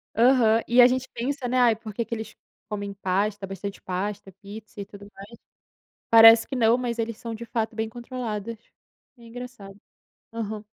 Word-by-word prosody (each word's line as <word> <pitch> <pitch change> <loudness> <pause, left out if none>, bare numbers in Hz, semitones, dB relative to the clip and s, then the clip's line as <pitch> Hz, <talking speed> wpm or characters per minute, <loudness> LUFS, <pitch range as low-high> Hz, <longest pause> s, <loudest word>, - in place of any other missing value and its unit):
Aham. 230 -1 +4
E 245 +1 +6
a 245 - +9
gente 255 +1 -1
pensa, 260 +2 -3
né: 255 +1 0
"Ai, 235 -2 +4
por 215 -1 -10
que 235 +1 -2
que - - -6
eles 220 0 -8 0.3
comem 205 -1 -5
pasta, 200 +1 -2
bastante 195 +1 -7
pasta, 195 +1 -4
pizza 210 +1 -11
e - - -6
tudo 200 0 -13
mais". 195 +1 -12 0.8
Parece 225 0 +8
que 265 - -5
não, 230 0 +4
mas 240 -2 -3
eles 230 -1 -3
são 230 -2 -6
de 235 - -8
fato 225 -1 -3
bem 220 0 -2
controlados. 230 -2 -6 0.6
É - - -18
engraçado. 230 -4 -10 0.6
Aham. 215 -2 -5
225 Hz, 180 wpm, -25 LUFS, 205-240 Hz, 0.8 s, a